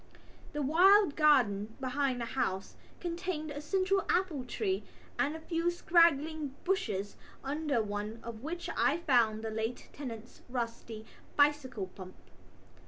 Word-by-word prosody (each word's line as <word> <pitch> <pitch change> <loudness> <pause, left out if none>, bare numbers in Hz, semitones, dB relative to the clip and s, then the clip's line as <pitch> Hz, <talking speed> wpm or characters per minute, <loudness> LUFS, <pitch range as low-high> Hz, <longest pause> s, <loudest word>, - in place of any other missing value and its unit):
The 295 0 -1
wild 360 +3 +5
garden 225 -9 +3
behind 260 -1 0
the 235 - -2
house 195 -6 -2 0.2
contained 340 -3 -3
a 290 0 -5
central 385 +4 +1
apple 350 -7 +1
tree 380 - -1 0.4
and 290 +2 +1
a - - -6
few 330 +1 0
straggling 315 -4 +2
bushes 205 - -1 0.3
under 280 -3 0
one 210 +2 -4
of 230 -1 -7
which 340 +5 -5
I 295 - +3
found 235 -9 +2
the 220 - -3
late 220 +2 -3
tenant's 235 -4 -8
rusty 230 -3 -4 0.3
bicycle 285 -8 +2
pump. 185 0 -11
280 Hz, 130 wpm, -32 LUFS, 225-330 Hz, 0.4 s, wild